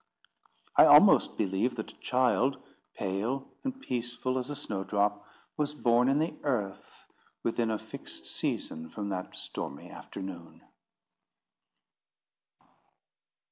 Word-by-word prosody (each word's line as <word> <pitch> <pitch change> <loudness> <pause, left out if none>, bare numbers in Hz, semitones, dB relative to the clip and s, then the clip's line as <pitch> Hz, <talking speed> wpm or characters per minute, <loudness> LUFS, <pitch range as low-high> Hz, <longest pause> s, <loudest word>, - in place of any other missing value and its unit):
I - - +9
almost - - +7
believe 100 +4 0
that 110 - -5
a - - -24
child, 130 +1 +2 0.4
pale 110 +8 -2 0.2
and 265 -1 -3
peaceful 125 - -2
as 125 +2 -5
a 145 - -3
snowdrop, 100 -1 -1 0.3
was 150 0 -1
born 120 -1 +3
in 135 - +3
the 160 +2 0
Earth 105 -9 -3 0.4
within 115 0 0
a 110 - 0
fixed - - -9
season 80 0 -3
from 100 +3 -5
that 95 -2 -4
stormy 70 - -6
afternoon. 95 -4 -8
115 Hz, 110 wpm, -30 LUFS, 100-130 Hz, 0.4 s, I